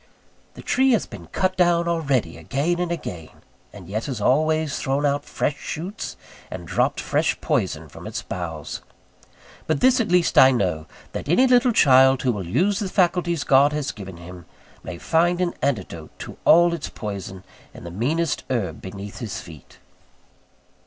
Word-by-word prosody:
The - - -11
tree 265 0 +3
has 225 - +1
been - - -11
cut 185 0 -1
down 175 -1 +3
already 140 - 0
again 140 - -1
and 175 -1 -1
again; 90 - -7 0.3
and 95 -4 -12
yet 110 +4 -3
has 130 -6 -4
always 155 +5 +1
thrown 140 +2 0
out 145 +1 0
fresh 145 -1 -2
shoots 185 +7 -6 0.3
and - - -7
dropped - - 0
fresh - - 0
poison - - -1
from - - -11
its - - -5
boughs. - - -6 0.9
But - - +1
this 255 0 +4
at 220 - -1
least 180 -1 +4
I 130 - +9
know: 90 -11 -1 0.2
that - - -6
any 215 +11 +5
little 250 -1 +4
child, 135 - +5
who 130 - +2
will 100 -6 -5
use 185 - +1
the 200 -3 -3
faculties 175 -4 +1
God 140 +2 +4
has 150 -2 -2
given 95 -5 -9
him, 85 0 -11 0.3
may 90 - -7
find 175 - +1
an 180 -1 0
antidote 95 - -2
to - - -8
all 170 +1 +6
its 165 -3 -4
poison 95 -3 -7 0.3
in - - -12
the 85 - -7
meanest 145 - -1
herb 100 - -2
beneath 100 +1 -8
his 110 -6 -5
feet. 80 -4 -13
140 Hz, 170 wpm, -23 LUFS, -, 0.9 s, I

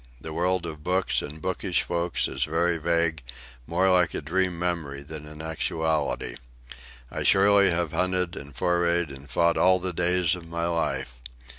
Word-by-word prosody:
The 80 +4 -7
world 90 +1 0
of 75 -2 -7
books 90 +2 +1
and 75 +2 -7
bookish 90 +1 -1
folk 85 0 -1
is - - -1
very 85 +2 +1
vague, 85 -1 +1 0.5
more 90 +4 +2
like 90 -2 +3
a - - -2
dream 90 +3 0
memory 85 -5 -3
than 75 +1 -9
an 75 +1 -9
actuality. 80 -5 -1 0.7
I - - -4
surely 100 0 +5
have 85 -2 0
hunted 90 -1 0
and 70 -1 -9
forayed 85 -2 +1
and 70 +1 -11
fought 85 0 +2
all 95 0 +5
the 90 0 -3
days 90 0 +2
of 85 -2 -10
my 85 0 -2
life. 80 -7 -2
85 Hz, 165 wpm, -26 LUFS, 80-90 Hz, 0.7 s, surely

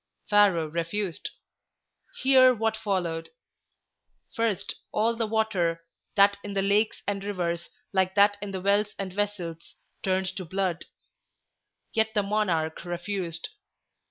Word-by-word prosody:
Pharaoh 200 -6 +5
refused. 170 +3 -2 0.9
Hear 260 -1 +7
what 225 0 0
followed. 185 -7 -2 1.1
First, 225 -4 0 0.2
all 230 +2 +2
the 230 -1 -1
water, 195 -7 0 0.3
that 200 0 +5
in 200 -1 -6
the 195 - +2
lakes 205 +2 +1
and 200 -1 -2
rivers, 170 -4 -2 0.2
like 190 0 +2
that 205 0 +5
in 205 - -4
the 190 -1 -4
wells 205 +2 +2
and 190 -2 -4
vessels, 185 -5 -3 0.3
turned 190 0 0
to 190 - -3
blood. 185 -1 -2 1.1
Yet 220 0 +1
the 205 - +3
monarch 185 -7 0
refused. 175 - -4
200 Hz, 125 wpm, -27 LUFS, 175-210 Hz, 1.1 s, Hear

